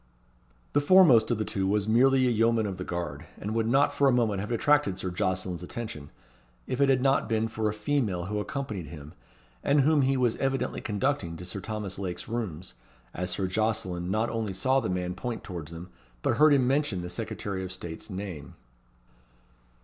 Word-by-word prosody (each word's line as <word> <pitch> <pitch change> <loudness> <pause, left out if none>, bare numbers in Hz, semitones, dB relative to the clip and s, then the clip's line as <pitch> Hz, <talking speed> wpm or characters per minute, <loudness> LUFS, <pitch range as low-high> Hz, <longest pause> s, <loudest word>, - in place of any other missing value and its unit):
The 145 - +3
foremost 145 -9 +6
of 120 - +1
the 110 - -1
two 95 -1 -1
was 105 +1 +1
merely 130 +4 +4
a 125 - +3
yeoman 115 0 +2
of 95 -3 -4
the 90 - -4
guard, 85 -4 -5
and 105 +2 -4
would 115 0 +1
not 135 +4 +3
for 140 - +3
a - - +5
moment 115 -5 +1
have 105 +4 -4
attracted 145 -3 +2
Sir 95 - -3
Jocelyn's 90 0 -2
attention, 90 -7 -6 0.6
if 130 +1 -2
it 140 - +5
had 130 -1 +3
not 135 0 +2
been 110 0 +1
for 110 -1 -1
a - - -1
female 105 -6 -1
who 105 +2 -2
accompanied 105 - -4
him, 75 0 -10 0.5
and 145 +1 +4
whom 150 +1 +4
he 135 0 +2
was 125 -3 +1
evidently 135 0 -1
conducting 105 -6 -1
to 90 - -8
Sir 95 +2 -5
Thomas 100 -1 -5
Lake's 90 -3 -4
rooms, 95 - -4 0.4
as 90 +1 -3
Sir 90 +2 -1
Jocelyn 95 -3 -1
not 110 +4 0
only 110 -4 -2
saw 130 +8 +2
the 130 - -3
man 90 -1 -2
point 120 +4 -5
towards 85 -4 -7
them, 85 +2 -9 0.3
but - - +1
heard 150 -1 +6
him 130 -2 +3
mention 130 -9 +1
the - - -4
Secretary 95 +2 -4
of 90 - -5
State's 85 0 -7
name. 95 -6 -6
105 Hz, 195 wpm, -28 LUFS, 90-130 Hz, 0.6 s, foremost